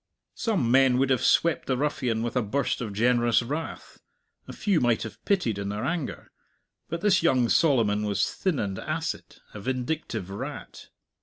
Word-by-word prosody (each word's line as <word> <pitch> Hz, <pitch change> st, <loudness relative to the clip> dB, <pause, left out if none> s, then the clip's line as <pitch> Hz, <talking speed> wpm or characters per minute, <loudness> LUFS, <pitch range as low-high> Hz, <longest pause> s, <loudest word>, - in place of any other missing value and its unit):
Some 195 Hz, -, 0 dB
men 130 Hz, -1 st, +5 dB
would 135 Hz, +1 st, +2 dB
have 130 Hz, -, +2 dB
swept 165 Hz, -4 st, +2 dB
the 130 Hz, -, +1 dB
ruffian 125 Hz, -5 st, -1 dB
with 120 Hz, 0 st, -3 dB
a 125 Hz, -, +3 dB
burst 120 Hz, +6 st, -1 dB
of 110 Hz, -4 st, -4 dB
generous 120 Hz, +2 st, +2 dB
wrath, 150 Hz, +7 st, -6 dB, 0.5 s
a -, -, -7 dB
few 200 Hz, -7 st, +1 dB
might 120 Hz, -2 st, +2 dB
have -, -, -9 dB
pitied 125 Hz, -, +1 dB
in 100 Hz, 0 st, -3 dB
their 105 Hz, +1 st, -3 dB
anger; 165 Hz, -4 st, -4 dB, 0.6 s
but 170 Hz, +1 st, -4 dB
this 195 Hz, -2 st, +3 dB
young 130 Hz, -8 st, +3 dB
Solomon 115 Hz, -10 st, +3 dB
was 100 Hz, -1 st, 0 dB
thin 185 Hz, -6 st, -1 dB
and 100 Hz, -4 st, -2 dB
acid, -, -, -4 dB, 0.2 s
a 105 Hz, -, -7 dB
vindictive 125 Hz, -, -3 dB
rat. 100 Hz, -, -7 dB
125 Hz, 170 wpm, -26 LUFS, 110-155 Hz, 0.6 s, men